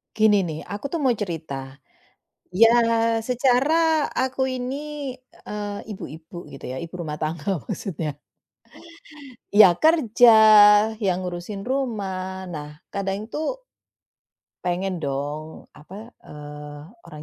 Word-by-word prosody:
Gini 215 -1 +4
nih, 155 -1 -5
aku 205 +7 -4
tuh 335 -3 -2
mau 265 - +3
cerita. 160 - -4 0.8
Iya, 225 +5 +6 0.6
secara 250 +4 +2 0.4
aku 260 +1 -1
ini, 255 0 -3 0.7
eee, 205 -1 -4
ibu-ibu 170 -3 -9
gitu 135 - -10
ya, 130 - -5
ibu 165 +3 -7
rumah 150 -2 -5
tangga 160 +4 -2
maksudnya. 160 - -4 1.4
Ya 200 -4 +7
kerja, 245 - +4 0.7
ya 195 - +2
ngurusin 185 +3 -6
rumah. 190 -8 -3
Nah, 150 0 -8 0.2
kadang 200 +2 -3
itu 235 - -6 1.3
pengen 180 +1 -1
dong, 145 +1 -5
apa, 195 +9 -11 0.2
eee, 150 0 -10 0.2
orang 150 0 -11
190 Hz, 110 wpm, -23 LUFS, 155-220 Hz, 1.4 s, Ya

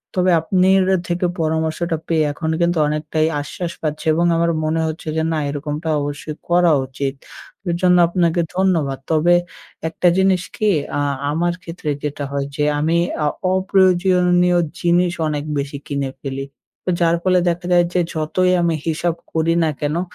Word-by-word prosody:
তবে 185 0 +3
আপনির 190 +3 +3 0.2
থেকে 175 +1 -1
পরামর্শটা 160 +1 -1
পেয়ে, 160 -2 +2
এখন 160 +2 -4
কিন্তু 170 0 +2
অনেকটাই 155 +1 0
আশ্বাস 170 +4 -5
পাচ্ছি 155 +1 -3
এবং 170 +2 +1
আমার 170 0 +2
মনে 155 +1 0
হচ্ছে 160 0 -6
যে, 160 - +1
না, 160 - 0
এরকমটা 150 +2 -4
অবশ্যই 145 +1 -5
করা 175 -1 +4
উচিত। 135 +1 -3 0.6
এর 170 - +1
জন্য 180 -1 +5
আপনাকে 170 -1 +1
ধন্যবাদ। 165 -8 +1
তবে 160 +2 +4 0.6
একটা 170 +2 0
জিনিস 190 -1 +3
কি? 215 0 +1 0.3
আ - - 0 0.3
আমার 175 +3 0
ক্ষেত্রে 165 -2 -6
যেটা 145 -1 -3
হয় 140 -1 -1
যে, 150 - 0 0.2
আমি 160 +3 +1 0.3
আ - - +3 0.3
অপ্রয়োজনীয় 180 -1 +3 0.2
জিনিস 175 0 +3 0.2
অনেক 150 -1 -2
বেশি 140 0 -3
কিনে 140 -2 -2
ফেলি। 135 -1 -4 0.5
যার 170 0 +3
ফলে 185 -1 +3
দেখা 175 +1 -3
যায় 175 0 +5
যে 180 - +2
যতই 165 +4 +1
আমি 170 -1 +1
হিসাব 165 +1 0 0.2
করি 160 +1 +2
না 160 - +2
কেনো, 150 +3 -1
165 Hz, 160 wpm, -19 LUFS, 155-180 Hz, 0.6 s, জন্য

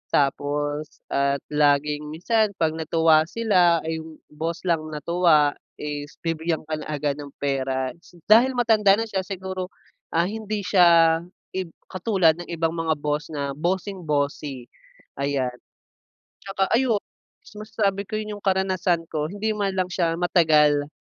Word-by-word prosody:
tapos 145 +1 -1
at 140 0 +1
laging 150 0 +2
minsan 215 +7 +1
'pag 160 -1 +2
natuwa 160 0 +3
sila, 180 -6 +3
ay, 160 0 -3
yung 160 -1 -11
boss 165 +3 -4
lang 165 -2 +1
natuwa, 155 -1 +3 0.2
is 145 -1 -5
bibigyan 165 -1 -1
ka 155 - -2
na - - -8
agad 145 -1 -2
ng 145 -1 -8
pera 130 -2 -1
s 175 - -20
Dahil 235 +5 +6
matanda 220 -5 +4
na - - +1
siya 195 -3 -2
siguro, 185 -1 -5 0.4
ah, 165 - +2
hindi 215 0 -4
siya, 170 -3 +5 0.4
ib 185 -3 -3 0.2
katulad 185 -4 +2
ng 175 - -7
ibang 165 -1 0
mga 165 -1 0
boss 150 +1 -2
na, 140 -2 -3
bossing-bossy, 150 -7 -2 0.5
ayan. 140 -2 0 0.9
Tsaka 195 -1 -1
ayun, 235 -4 +2 0.6
masasabi 210 -2 -1
ko 215 - -4
'yon 215 -1 -5
yung - - -30
karanasan 185 -3 +1
ko, 150 -1 -1
hindi 210 +2 -2
man 200 -2 0
lang 185 -1 0
siya 170 -2 0
matagal, 150 -5 +3
165 Hz, 145 wpm, -24 LUFS, 150-190 Hz, 0.9 s, Dahil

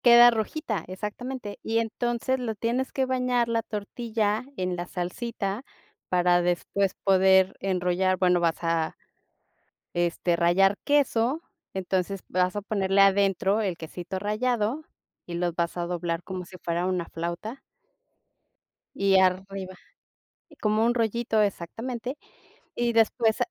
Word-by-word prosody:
Queda 240 0 +9
rojita, 220 - -2
exactamente. 210 +4 -6
Y 225 - -1
entonces 240 +3 -1
lo 230 -3 -3
tienes 235 +5 -1
que 265 - 0
bañar 250 -2 +1
la 230 -1 +1
tortilla 215 0 -2
en 180 -1 -1
la 175 0 -5
salsita 200 +4 -3 0.5
para 175 -1 +3
después 180 +2 0
poder 190 0 +5
enrollar, 185 0 +1
bueno, 180 -1 +3
vas 170 -1 +1
a, 165 -1 0 1.0
este, 175 0 +1
rallar 180 +4 +4
queso, 280 0 +2 0.3
entonces 190 0 -1
vas 180 +1 +1
a 205 - -2
ponerle 195 -1 +1
adentro 195 +1 +3
el 190 -5 -1
quesito 175 +3 -6
rallado 220 +5 0 0.4
y 175 - -6
los 175 0 -1
vas 170 0 -1
a 175 -1 -2
doblar 170 -1 -2
como 185 -1 -5
si 185 +1 -12
fuera 170 +1 -1
una 180 -2 -1
flauta. 170 +9 -5 1.4
Y 195 -1 +4
arriba 190 0 0 0.9
Como 215 +1 +2
un 240 +1 +3
rollito 230 -1 +1
exactamente. 230 - -3 0.6
Y 240 0 0
después 225 0 +3
195 Hz, 130 wpm, -26 LUFS, 180-230 Hz, 1.4 s, Queda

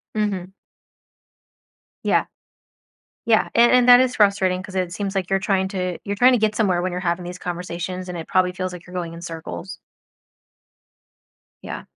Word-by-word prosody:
Mhm. 195 -3 -2 1.5
Yeah. - - +2 1.0
Yeah, 225 -2 +3
and 235 +1 +6
and 250 -1 +4
that 245 0 +9
is 255 -1 +1
frustrating 190 -3 +2
'cause 190 -1 -11
it 185 -2 -1
seems 195 +2 -4
like 185 -2 -1
you're 195 - +2
trying 190 -1 0
to 185 -3 -3
you're 200 0 -3
trying 250 +5 +6
to 250 - +3
get 215 -1 +1
somewhere 190 -5 +1
when 185 0 -2
you're 180 - -3
having 175 0 -1
these 180 +1 -7
conversations, 180 +1 -5
and 180 - -5
it 165 - -6
probably 185 -1 +2
feels 185 0 -4
like 175 -1 -10
you're 185 - -12
going 170 -2 -4
in 170 - -9
circles. 160 - -7 1.8
Yeah. - - -6
185 Hz, 175 wpm, -22 LUFS, 180-205 Hz, 1.8 s, that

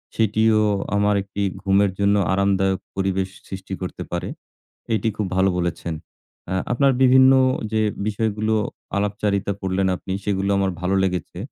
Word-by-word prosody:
সেটিও 110 0 +3 0.4
আমার 105 0 +2
একটি 100 +1 -6 0.2
ঘুমের 100 0 +3
জন্য 100 0 +3 0.2
আরামদায়ক 95 -1 +1 0.2
পরিবেশ 95 -1 0 0.2
সৃষ্টি 95 0 -7
করতে 90 - -5
পারে। - - -3 0.7
এটি 110 +1 0
খুব 105 - -1
ভালো 95 +1 +4
বলেছেন। 85 -1 -2 0.6
আ - - -1 0.2
আপনার 135 +2 +3
বিভিন্ন 130 +1 +7 0.4
যে 110 - +2 0.3
বিষয়গুলো 110 0 0 0.4
আলাপচারিতা 100 0 0
করলেন 95 0 0
আপনি 95 - -7
সেগুলো 100 -1 0
আমার 100 -1 +1
ভালো 90 +1 0
লেগেছে। 90 -2 -3
100 Hz, 135 wpm, -22 LUFS, 95-105 Hz, 0.7 s, বিভিন্ন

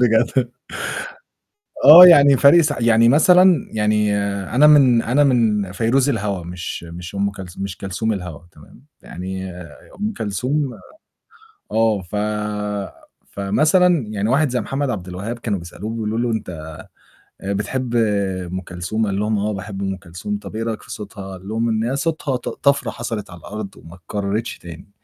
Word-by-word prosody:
بجد. 120 +1 +2 1.3
آه، 165 +6 +11
يعني 140 -5 +7
فرق 145 +6 +6
س 155 - +1
يعني 115 0 +4
مثلًا 180 +5 +5
يعني 105 -1 +1 0.4
أنا 145 +4 +6
من 130 -6 +6
أنا 140 +5 +2
من 110 -7 +1
فيروز 120 +7 +1
الهوا 100 -8 -2
مش 90 0 -6
مش 85 +2 -9
أم 100 0 0
كلثو 95 -2 -10
مش 100 -2 -5
كلثوم 100 +4 -3
الهوا 90 -6 -6
تمام، 75 - -18 0.2
يعني 95 +1 -6 0.5
أم 210 +2 -1
كلثوم 125 +7 -2 1.0
آه، 110 -2 +1
ف 90 +4 -7 1.2
فمثلًا 155 - +2
يعني 105 0 -2
واحد 140 +5 +2
زي 125 0 -1
محمد 140 0 -2
عبد 95 -6 -5
الوهاب 100 +7 -5
كانوا 105 -4 -2
بيسألوه 85 +5 -8
بيقولوا 110 -1 -3
له: 120 0 0
"أنت 85 -8 -5 0.7
آآ 100 +1 -3
بتحب 120 +5 -3
أم 95 -5 -1
كلثوم؟" 90 +5 -3
قال 100 -1 -2
لهم: 105 0 0
"آه، 105 +1 -1
باحب 100 0 -6
أم 95 -1 -2
كلثوم" 95 +3 -6
"طَب 100 +1 -10
إيه 115 - -2
رأيك 115 -1 -4
في - - -13
صوتها" 100 -1 -8
قال 95 +2 -14
لهم 115 +2 -1
إن 110 0 0
هي 125 +4 -1
"صوتها 150 -2 -2
ط 125 - -4
طفرة 140 -3 0
حصلِت 115 -4 -5
على 90 - -11
الأرض 105 +3 -8
وما 85 +2 -13
اتكرّرتش 100 +5 -4
تاني." 85 +2 -11
110 Hz, 160 wpm, -20 LUFS, 95-125 Hz, 1.3 s, آه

